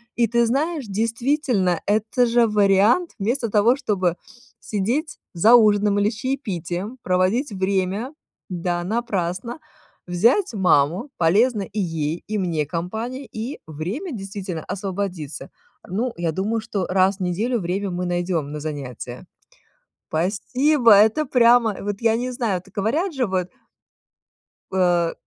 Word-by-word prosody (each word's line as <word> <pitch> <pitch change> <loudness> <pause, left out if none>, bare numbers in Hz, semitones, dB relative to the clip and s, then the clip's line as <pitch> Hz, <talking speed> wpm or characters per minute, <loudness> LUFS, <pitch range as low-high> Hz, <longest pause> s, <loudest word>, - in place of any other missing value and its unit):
И 235 - +3
ты 235 +1 +2
знаешь, 290 +2 -1
действительно, 225 - 0
это 220 +4 +2
же 235 0 +3
вариант: 210 - +3
вместо 230 +3 -1
того, 225 +4 +4
чтобы 190 - 0 0.4
сидеть 235 +10 -2 0.2
за 215 +8 +5
ужином 205 -2 +4
или 205 +1 +3
с 220 - -7
чаепитием, 215 - -4
проводить 190 +9 +1
время, 195 +6 -1 0.4
да, 175 -1 -2
напрасно, 205 - -2 0.5
взять 230 - +2
маму. 180 - +2
Полезно 205 +7 +3
и 210 +2 -6
ей, 165 -2 -2
и 215 0 -2
мне 165 -5 -1
компания, 220 - -4
и 230 +6 -5
время, 190 - -5
действительно, 195 -5 -6
освободится. 185 -6 -5 0.4
Ну, 230 +7 -2
я 170 -2 -1
думаю, 210 +7 -1
что 195 -4 -3
раз 190 +1 +2
в - - -11
неделю 215 +7 0
время 190 +2 -2
мы 180 +1 -3
найдём 175 -4 -1
на 150 - -5
занятия. 140 -6 -6 0.8
Спасибо! 230 - +3
Это 220 +9 +4
прямо 235 -4 +4
вот- 205 0 -4
я 225 -1 +3
не 250 +2 -2
знаю. 225 -8 -1
Так - - -21
говорят 295 - 0
же 255 -2 +1
вот 185 -1 -1 1.2
э, 175 -3 +2
205 Hz, 135 wpm, -22 LUFS, 180-235 Hz, 1.2 s, за